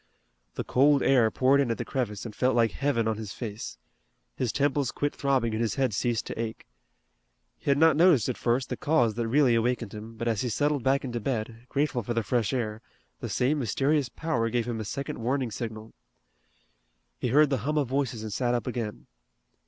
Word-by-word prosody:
The - - -2
cold 140 +2 +3
air 125 -5 +4
poured 135 +5 +3
in 135 - 0
at 115 - -1
the - - -4
crevice 115 -6 -3
and 110 - -7
felt 130 -1 +2
like 115 -2 +3
heaven 130 -5 0
on 110 -1 0
his 105 -2 -6
face. 110 -2 -6 0.6
His 125 -4 -1
temples 140 0 +1
quit 145 0 -2
throbbing 130 -5 +1
and 110 - -1
his 115 - 0
head 130 -5 +1
ceased 115 +1 0
to - - -6
ache. 115 -1 -5 0.9
He - - -4
had 140 - +4
not 160 0 +5
noticed 160 - +5
at 130 - -1
first 125 +2 0
the - - -3
cause 125 -8 +2
that 115 +1 -2
really 130 0 +4
awakened 115 -2 0
him, 110 +2 -9
but 115 +1 -3
as 115 -3 +1
he 125 - -1
settled 145 +4 +1
back 135 +2 +2
into 120 -2 -3
bed, 115 0 -4
grateful 140 -3 0
for 120 +2 -4
the 115 - +1
fresh 110 0 0
air, 110 -4 -2 0.4
the - - -5
same 140 +4 +1
mysterious 135 +3 +1
power 120 -8 -1
gave 120 0 -1
him 115 -2 -3
a 110 - -4
second 140 +5 -4
warning 125 +1 -1
signal. 110 0 -6 1.3
He - - -1
heard 145 +4 +4
the 135 - +1
hum 150 +7 -1
of 145 -3 +1
voices 130 -4 -1
and 110 -2 -5
sat 120 +1 +1
up 120 - -2
again. 115 -4 -4
120 Hz, 210 wpm, -27 LUFS, 115-140 Hz, 1.3 s, not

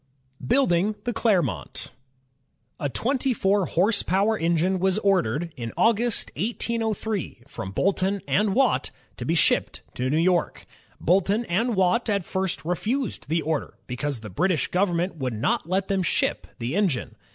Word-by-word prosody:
Building 195 - +2
the 240 - -2
Clermont 180 - 0 0.9
A 145 - -1
twenty 260 - 0
four 195 -1 +2
horse 200 +5 +2
power 200 +5 +2
engine 170 +1 +1
was 190 +1 +2
ordered, 175 - +1
in 115 -2 -5
August, 230 0 +2
1803, 220 - -2
from 95 -9 -6
Boulton 195 - +1
and 210 -1 +2
Watt, 270 - +2 0.3
to - - -5
be 165 - +1
shipped 160 - +2
to 125 +1 -2
New 150 - +1
York.. 175 +1 +1 0.3
Boulton 195 +6 +2
and 225 +6 0
Watt 190 +6 +2
at 200 -4 0
first 190 -4 -2
refused 215 - -2
the 165 0 +1
order, 155 0 -2
because 130 0 -3
the 110 -3 -8
British 180 - +1
government 180 -1 0
would 130 -4 -2
not 115 +8 -1
let 190 +1 0
them 195 -2 +1
ship 180 - 0
the 120 +7 -3
engine. 170 - 0
185 Hz, 150 wpm, -25 LUFS, 160-210 Hz, 0.9 s, Building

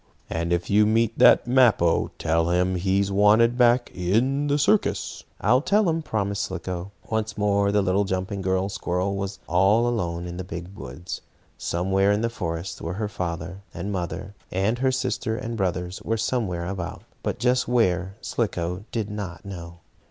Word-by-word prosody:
And 85 +1 -1
if 85 0 0
you 105 +1 +4
meet 115 +1 +2
that - - +7
Mappo, 120 -10 +4
tell 80 +1 +1
him 90 +1 +2
he 95 +2 +1
is 100 0 -1
wanted 105 +4 +5
back 120 0 +3
in 120 +11 +1
the 145 0 +2
circus." 200 +9 +1
"I'll 125 +6 +3
tell 200 +5 +3
him," 165 0 +1
promised 100 -7 -2
Slicko. 95 0 -5 0.2
Once 110 0 -1
more 100 -1 +2
the 105 -1 +2
little 95 +2 +2
jumping 95 +1 -2
girl 95 0 +1
squirrel 95 0 -2
was 100 0 -4
all 100 +7 +3
alone 85 -7 -2
in 90 0 -6
the 95 - -4
big 90 +2 -7
woods. 65 +7 -7 0.3
Somewhere 95 +3 +1
in 105 +1 +1
the 115 0 0
forest 85 -4 -4
were 85 +2 -4
her 105 +1 -2
father 90 0 -4
and 95 +4 -4
mother, 90 +1 -4 0.2
and 100 +6 0
her 130 0 +2
sister 115 -3 -1
and 115 -2 -4
brothers 90 -2 -2
were 115 +1 -1
somewhere 100 -8 -1
about. 95 -1 -5 0.2
But - - -2
just 125 +1 +2
where, 95 -6 +1
Slicko 90 -3 -2
did 110 -3 -2
not 100 -4 -6
know. 85 -3 -8
100 Hz, 175 wpm, -25 LUFS, 90-110 Hz, 0.3 s, that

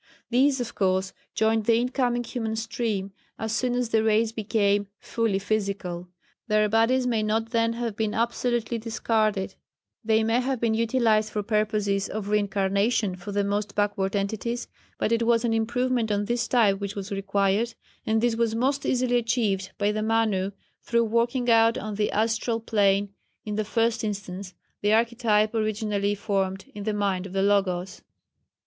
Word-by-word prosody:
These, 265 +2 +3
of 240 -1 -4
course, 190 0 0 0.2
joined 220 0 +2
the 230 0 +4
in 245 +1 0
coming 245 -2 0
human 225 -2 -3
stream 220 -3 -2 0.3
as 220 0 -3
soon 250 -1 0
as 245 -2 -1
the 220 -1 +2
race 220 0 +2
became 205 -2 +1
fully 225 -4 -1
physical. 195 -4 -2 0.4
Their 215 -1 +3
bodies 230 +4 +3
may 230 -3 +1
not 220 +1 -1
then 230 -1 +2
have 230 -2 -3
been 215 -1 -1
absolutely 235 0 0
discarded; 215 -3 0 0.5
they 220 0 +3
may 225 +2 +2
have 260 -1 -1
been 230 -1 +1
utilized 225 -1 +2
for 210 -1 -3
purposes 210 -2 0
of 205 -1 -4
reincarnation 200 0 +1
for 185 +3 -8
the 200 0 +1
most 205 +1 -2
backward 205 -1 0
entities, 220 +4 -2 0.3
but - - -1
it 230 0 +2
was 230 0 +2
an 230 - +1
improvement 235 0 0
on 205 0 0
this 240 +1 -1
type 210 -6 +3
which 200 0 -4
was 200 0 -6
required, 200 +3 0 0.3
and 220 0 +1
this 240 -1 +2
was 230 -1 0
most 270 +4 0
easily 245 -1 +2
achieved 225 -5 0
by 205 0 +1
the 215 0 -2
Manu, 215 -4 +1 0.3
through 235 0 +1
working 235 +3 0
out 230 0 +5
on 215 -1 -4
the 210 +1 0
astral 225 +2 0
plane 200 -3 +1 0.3
in 210 - -3
the 215 +1 0
first 225 +2 0
instance, 195 -2 -5 0.3
the 205 - +1
architype 225 -2 +2
originally 210 -2 0
formed 195 -2 -2
in 205 -1 -7
the 215 - 0
mind 195 -2 -1
of 185 - -11
the 195 0 +1
Logos. 195 -2 0
220 Hz, 170 wpm, -26 LUFS, 200-230 Hz, 0.5 s, out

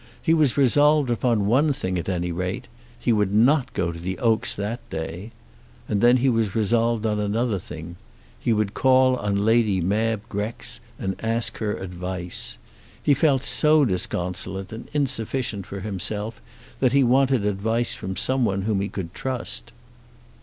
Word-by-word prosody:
He 165 - +2
was 150 -6 +3
resolved 145 0 +4
upon 115 -3 +1
one 135 +8 +3
thing 95 -8 -2
at 85 - -4
any 90 -1 -1
rate. 90 +3 -3 0.3
He 120 - +1
would 105 -3 +1
not 125 +6 +3
go 85 -3 -1
to 85 - -8
the 95 +2 -4
Oaks 115 -4 +2
that 105 +4 -3
day. 85 +6 -5 0.6
And 105 -2 0
then 120 +1 +6
he 130 +2 +1
was 115 -5 +1
resolved 115 +1 +1
on 105 -1 0
another 105 +1 0
thing. 85 +1 -9 0.4
He - - 0
would 105 -2 0
call 130 -1 +4
on 100 -2 -1
Lady 110 -4 +3
Mab 105 +4 0
Grex 105 +3 -4 0.2
and 95 0 -3
ask 115 +1 -1
her 105 -2 -1
advice. 90 -1 -5 0.5
He 145 - +4
felt 140 -1 +2
so 145 +5 +4
disconsolate 90 -1 -2
and 110 +2 -8
insufficient 125 -7 -2
for 100 0 -6
himself 105 +3 -4 0.4
that 130 -2 +2
he 140 -1 +5
wanted 130 -2 +3
advice 110 +4 0
from 95 +1 -5
someone 115 -7 +1
whom 105 -2 0
he 100 - -2
could 85 -4 -6
trust. 130 -2 -4
110 Hz, 160 wpm, -24 LUFS, 95-125 Hz, 0.6 s, then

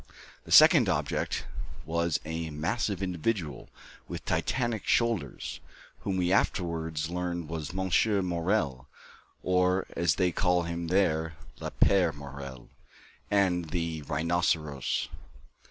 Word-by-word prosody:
The - - -11
second - - +8
object - - -1 0.4
was 85 0 0
a 80 0 -3
massive 95 +6 -1
individual, 90 -3 -2 0.4
with - - -6
Titanic 120 -4 -1
shoulders, 115 - 0 0.4
whom 95 -2 -2
we 90 -1 +1
afterwards 80 -4 0
learned 85 -2 -3
was 80 -1 -4
Monsieur 95 +2 +2
Morel, 85 -7 -1 0.6
or, 90 +1 +2
as 85 -3 +2
they 90 -2 +2
call 90 0 +2
him 85 0 -4
there, 80 -4 +1 0.2
"Le - - -4
père 90 -6 +3
Morel," 70 -3 -9 0.6
and 90 -5 +2
"The 85 -2 -2
Rhinoceros." 75 -1 0
85 Hz, 110 wpm, -29 LUFS, 80-95 Hz, 0.6 s, second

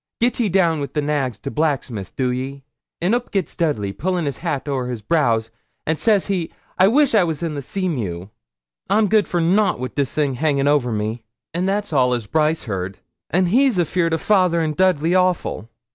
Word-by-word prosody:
Get 245 +2 +1
ye 225 -4 +2
down 170 -4 +2
wi' 140 - -3
the 150 - -1
nags 145 -5 -1
to 140 - -6
blacksmith, 135 - -2
do 130 -2 0
ye." 135 +2 -5 0.4
An' 180 +6 +2
oop 245 0 -1
gits 195 -4 -2
Dudley, 110 - -1
pullin' 180 - -1
his 140 -3 -3
hat 155 -5 -3
ower 130 -3 -1
his 120 -4 -5
brows, 115 -6 +1 0.3
an' 160 0 0
says 210 0 +2
he, 185 -5 -2 0.3
"I 190 - +7
wish 280 +5 +3
I 210 -4 +5
was 165 -1 -3
in 165 -2 -2
the 145 - -4
Seamew. 120 - -3 0.6
I'm 215 0 +3
good 215 0 +3
for 175 - -1
nout 190 - +2
wi' 130 0 -3
this 140 -4 -1
thing 145 -3 +1
a - - -5
hangin' 145 -3 +1
ower 145 -4 +2
me." 110 +2 -2 0.3
An' 180 +2 -1
that's 200 -2 -1
all 125 -3 +3
as 120 -3 -4
Brice 155 +6 +1
heard. 95 -3 -4 0.3
An' 180 +5 +2
he's 245 +4 +3
afeard 170 -1 +1
o' - - 0
fayther 185 -3 +2
and 155 -2 -1
Dudley 175 -2 +2
awful. 180 - 0
155 Hz, 205 wpm, -21 LUFS, 130-185 Hz, 0.6 s, I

